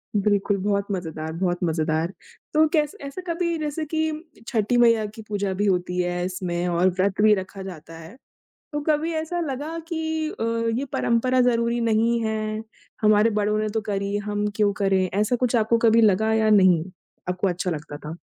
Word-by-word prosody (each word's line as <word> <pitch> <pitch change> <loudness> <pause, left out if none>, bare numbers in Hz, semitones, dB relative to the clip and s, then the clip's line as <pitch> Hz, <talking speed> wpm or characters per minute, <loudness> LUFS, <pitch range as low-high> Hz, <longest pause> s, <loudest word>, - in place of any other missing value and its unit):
बिल्कुल, 205 0 +2
बहुत 200 +1 0
मज़ेदार, 160 -4 -4
बहुत 175 +1 -1
मज़ेदार। 160 +1 0 0.4
तो 310 +1 +5
कैस 305 +3 +1
ऐसा 280 +6 -6
कभी 340 0 -1
जैसे 310 0 -3
कि 315 +1 -1
उम 305 0 -6 0.3
छठी 230 0 +1
मईया 230 -2 +4
की 215 +2 -9
पूजा 200 -2 -2
भी 200 +2 -1
होती 180 -2 0
है 175 0 -2
इसमें, 180 -1 -2
और 175 +1 +3
व्रत 190 +2 0
भी 215 0 +6
रखा 190 0 -6
जाता 165 -3 -9
है, 165 +6 -12 0.6
तो 295 - -1
कभी 310 +2 +1
ऐसा 320 +2 -2
लगा 305 +1 -4
कि 320 -2 -2
अ, - - -7 0.4
ये 275 - -2
परंपरा 255 +2 +2
ज़रूरी 235 -1 +2
नहीं 230 +1 +2
है, 215 0 -2 0.4
हमारे 215 +1 +5
बड़ों 210 0 0
ने 215 0 0
तो 220 +1 -1
करी 200 -1 -2
हम 205 0 -1
क्यों 210 -2 +3
करें, 190 -1 +2
ऐसा 210 +4 +2
कुछ 245 0 +1
आपको 225 +1 +2
कभी 225 +1 +5
लगा 220 0 +3
या 220 -1 +3
नहीं? 185 -6 +5 0.4
आपको 180 +2 0
अच्छा 180 +1 -2
लगता 150 -2 -5
था? 150 +2 -8
210 Hz, 185 wpm, -24 LUFS, 185-245 Hz, 0.6 s, भी